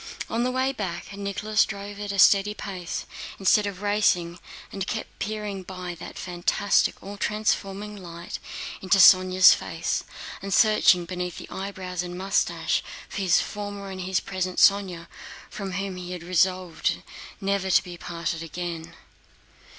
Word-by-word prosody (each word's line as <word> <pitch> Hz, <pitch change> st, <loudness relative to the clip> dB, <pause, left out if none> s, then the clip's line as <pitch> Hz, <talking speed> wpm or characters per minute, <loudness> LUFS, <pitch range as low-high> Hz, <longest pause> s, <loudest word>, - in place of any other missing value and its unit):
On 230 Hz, +1 st, +1 dB
the 250 Hz, -, +1 dB
way 260 Hz, +1 st, +1 dB
back 195 Hz, -3 st, -5 dB
Nicholas 205 Hz, +2 st, +1 dB
drove 200 Hz, 0 st, -6 dB
at 205 Hz, -1 st, -3 dB
a 200 Hz, -, -4 dB
steady 200 Hz, +2 st, +5 dB
pace 185 Hz, -5 st, -5 dB, 0.3 s
instead 205 Hz, +2 st, +3 dB
of 200 Hz, 0 st, -6 dB
racing 180 Hz, -4 st, +1 dB, 0.3 s
and 195 Hz, -1 st, -4 dB
kept -, -, -5 dB
peering 210 Hz, -2 st, -3 dB
by 180 Hz, -1 st, -6 dB
that -, -, -9 dB
fantastic 180 Hz, +3 st, +1 dB
all 200 Hz, +1 st, -7 dB
transforming 210 Hz, -1 st, -1 dB
light 170 Hz, -3 st, -8 dB, 0.4 s
into 190 Hz, +1 st, +3 dB
Sónya's 185 Hz, 0 st, +8 dB
face -, -, -2 dB, 0.4 s
and 195 Hz, -, -5 dB
searching 200 Hz, -4 st, +5 dB
beneath 180 Hz, 0 st, -4 dB
the -, -, -8 dB
eyebrows 185 Hz, -2 st, -4 dB
and 180 Hz, 0 st, -6 dB
mustache 195 Hz, +1 st, +1 dB, 0.3 s
for -, -, -7 dB
his 185 Hz, -3 st, +4 dB
former 205 Hz, -1 st, -6 dB
and 185 Hz, 0 st, -6 dB
his 185 Hz, 0 st, 0 dB
present 185 Hz, -1 st, -3 dB
Sónya 190 Hz, -4 st, +4 dB, 0.5 s
from 195 Hz, -2 st, -5 dB
whom 195 Hz, 0 st, -3 dB
he 180 Hz, 0 st, -6 dB
had 175 Hz, -2 st, -7 dB
resolved 180 Hz, 0 st, +1 dB, 0.4 s
never 195 Hz, -1 st, 0 dB
to 185 Hz, -, +5 dB
be 180 Hz, -2 st, -8 dB
parted 170 Hz, -1 st, -4 dB
again. 165 Hz, 0 st, -6 dB
190 Hz, 150 wpm, -25 LUFS, 180-200 Hz, 0.5 s, Sónya's